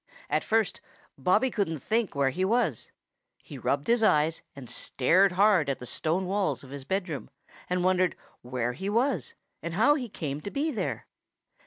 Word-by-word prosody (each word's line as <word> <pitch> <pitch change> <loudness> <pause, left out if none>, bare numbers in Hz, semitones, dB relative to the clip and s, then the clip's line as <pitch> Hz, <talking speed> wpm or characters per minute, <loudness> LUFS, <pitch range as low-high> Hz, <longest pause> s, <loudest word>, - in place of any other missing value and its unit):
At - - +2
first, 225 -2 +1 0.3
Bobby 195 - +2
couldn't 195 -8 -1
think 220 - -1
where 140 -1 +2
he 185 +7 -2
was. 205 - +1 0.5
He - - -11
rubbed 140 +1 0
his 235 0 +3
eyes 160 -6 +3
and 135 -3 -9
stared 180 +12 +2
hard 190 -6 +4
at 135 - 0
the 125 - -9
stone 165 +8 -1
walls 185 -8 -1
of 135 - -12
his 140 -1 -7
bedroom 180 -4 -3 0.4
and 180 0 0
wondered 185 -1 +2 0.3
where 125 -1 -2
he 190 +8 -4
was 240 +7 0 0.3
and 170 0 -4
how 255 +9 +5
he 255 -5 -3
came 150 -6 -4
to 200 - -5
be 295 +7 -1
there. 165 - -3
180 Hz, 175 wpm, -28 LUFS, 140-210 Hz, 0.5 s, how